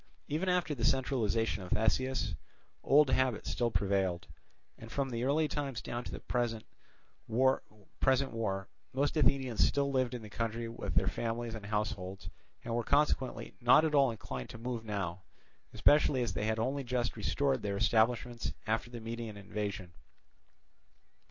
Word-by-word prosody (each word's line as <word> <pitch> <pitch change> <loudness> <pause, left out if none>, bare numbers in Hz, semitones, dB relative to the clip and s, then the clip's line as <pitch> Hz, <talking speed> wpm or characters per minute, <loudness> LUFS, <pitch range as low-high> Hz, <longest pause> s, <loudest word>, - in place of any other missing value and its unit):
Even 160 +6 -1
after 180 -4 +1
the 120 -5 -5
centralization 115 -6 +1
of 90 - -8
Theseus, 115 -1 +1 0.5
old 140 0 +5
habit 130 -4 +1
still 120 -1 0
prevailed; 95 -5 0 0.5
and 115 0 -11
from 135 0 -1
the 120 0 -2
early 150 +4 +2
times 140 -6 -3
down 120 +4 -4
to - - -6
the - - -6
present 120 -3 -2 0.6
war 130 +4 +3 1.3
most 140 +4 +1
Athenians 135 -6 +3
still 140 0 +2
lived 130 -2 +1
in 120 - -6
the 105 - -9
country 115 +1 -2
with 115 - -5
their - - +3
families 115 0 -2
and 105 -3 -7
households, 100 -3 -3 0.3
and 115 - -3
were 120 0 0
consequently 140 -1 +1
not 125 +6 +6
at 155 - 0
all 140 -2 +5
inclined 65 - -6
to - - -8
move 120 0 -4
now, 95 -5 -3 0.5
especially 145 -3 +4
as 120 - -2
they 105 - -1
had 110 0 0
only 135 +5 -1
just 125 -1 -1
restored 135 -3 0
their 100 -1 -2
establishments 120 +2 +1
after 110 +2 -1
the 120 -1 -7
Median 115 -1 -5
invasion. 100 -3 -4
120 Hz, 155 wpm, -32 LUFS, 110-130 Hz, 1.3 s, not